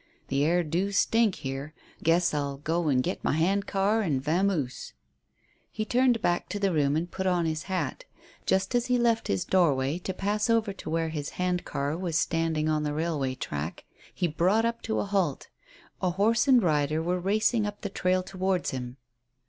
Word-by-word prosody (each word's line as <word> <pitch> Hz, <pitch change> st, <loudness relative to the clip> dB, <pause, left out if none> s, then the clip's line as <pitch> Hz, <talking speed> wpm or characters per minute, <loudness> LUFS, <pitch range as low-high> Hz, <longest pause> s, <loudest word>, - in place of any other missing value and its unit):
The 140 Hz, +1 st, +1 dB
air 175 Hz, +3 st, +2 dB
do 175 Hz, +6 st, -1 dB
stink 220 Hz, 0 st, +3 dB
here; 135 Hz, +3 st, -6 dB, 0.3 s
guess 170 Hz, +1 st, +3 dB
I'll 140 Hz, -2 st, -2 dB
go 160 Hz, +3 st, -1 dB
and 130 Hz, -3 st, +3 dB
git -, -, -3 dB
my -, -, +1 dB
hand 190 Hz, +6 st, +1 dB
car 200 Hz, +3 st, +1 dB
and 155 Hz, -10 st, 0 dB
vamoose." 155 Hz, -2 st, -1 dB, 0.8 s
He 215 Hz, -, -3 dB
turned 245 Hz, -1 st, +2 dB
back 175 Hz, 0 st, 0 dB
to 205 Hz, -, -3 dB
the 195 Hz, -2 st, +1 dB
room 145 Hz, -2 st, +2 dB
and 170 Hz, +3 st, -2 dB
put 190 Hz, 0 st, -2 dB
on 175 Hz, -2 st, +2 dB
his 155 Hz, 0 st, -2 dB
hat. 190 Hz, -, -2 dB, 0.4 s
Just 190 Hz, +4 st, +1 dB
as 245 Hz, 0 st, +1 dB
he 250 Hz, 0 st, +2 dB
left 235 Hz, -2 st, +1 dB
his 95 Hz, -2 st, 0 dB
doorway 150 Hz, -4 st, +2 dB
to 185 Hz, -, -4 dB
pass 205 Hz, +4 st, -1 dB
over 225 Hz, -3 st, +2 dB
to 190 Hz, -, -8 dB
where 165 Hz, 0 st, 0 dB
his 150 Hz, -3 st, -4 dB
hand 180 Hz, -1 st, 0 dB
car 140 Hz, +2 st, -2 dB
was 170 Hz, -2 st, -1 dB
standing 165 Hz, -2 st, 0 dB
on 155 Hz, -1 st, +1 dB
the 150 Hz, -1 st, -2 dB
railway 150 Hz, -5 st, -1 dB
track, 75 Hz, -, -5 dB, 0.3 s
he 175 Hz, -, -1 dB
brought 185 Hz, +8 st, +2 dB
up 230 Hz, 0 st, -1 dB
to 220 Hz, -, -2 dB
a -, -, 0 dB
halt 195 Hz, -8 st, -1 dB, 0.5 s
A 185 Hz, -, +2 dB
horse 210 Hz, +9 st, +2 dB
and 255 Hz, -4 st, +6 dB
rider 155 Hz, -2 st, +1 dB
were 175 Hz, +3 st, -1 dB
racing 215 Hz, +3 st, +1 dB
up 205 Hz, 0 st, -7 dB
the 200 Hz, -, -3 dB
trail 185 Hz, -1 st, 0 dB
towards 190 Hz, -1 st, -1 dB
him. 125 Hz, -1 st, -6 dB
175 Hz, 195 wpm, -27 LUFS, 150-200 Hz, 0.8 s, and